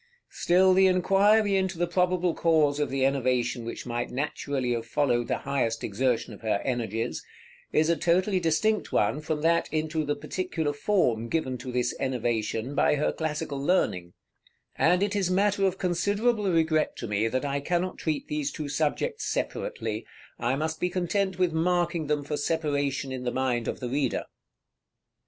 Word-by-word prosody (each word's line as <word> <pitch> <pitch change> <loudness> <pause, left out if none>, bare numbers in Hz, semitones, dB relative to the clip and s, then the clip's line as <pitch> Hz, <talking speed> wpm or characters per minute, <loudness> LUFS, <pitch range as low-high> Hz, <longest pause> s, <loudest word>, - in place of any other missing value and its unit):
Still 185 +2 +4
the 190 +1 +5
inquiry 200 +3 +4
into 190 -2 0
the 175 - +1
probable 180 0 +1
cause 155 -4 +2
of 150 - 0
the 135 0 +1
enervation 125 -3 0
which 115 - -6
might 120 0 -3
naturally 135 -2 -2
have 115 -1 -2
followed 120 -4 +1
the - - 0
highest 135 -5 -1
exertion 120 +3 0
of - - -12
her 110 -3 0
energies, 115 -2 -2 0.5
is 155 0 +3
a 170 - +3
totally 185 +4 +2
distinct 180 +6 +1
one 120 +8 +1
from 155 0 -2
that 170 +1 +2
into 155 0 -1
the 145 0 -1
particular 160 -1 -3
form 125 - +1
given 130 -4 -1
to 125 +1 -6
this 125 0 0
enervation 120 -1 -1
by 145 - +3
her 150 - +1
classical 150 -3 -3
learning; 90 - +1 0.6
and 180 +2 +3
it 205 +1 -1
is 195 -3 +1
matter 195 +1 +2
of 190 0 -2
considerable 200 +4 +1
regret 160 -2 +1
to - - -5
me 105 +1 +1
that 130 +4 -1
I 140 0 -1
cannot 175 +5 -1
treat 155 -3 -2
these 150 -1 -2
two 150 -1 -5
subjects 150 +1 -1
separately: 110 0 -3 0.3
I 120 +3 +1
must 155 +2 -2
be 180 - 0
content 185 +1 -1
with 180 -3 +1
marking 170 -1 +1
them 150 -1 0
for 145 +1 -3
separation 145 -3 -1
in 130 -1 -5
the 125 - 0
mind 125 -3 -1
of - - -3
the 125 - -4
reader. 135 -1 -1
150 Hz, 170 wpm, -27 LUFS, 130-180 Hz, 0.6 s, the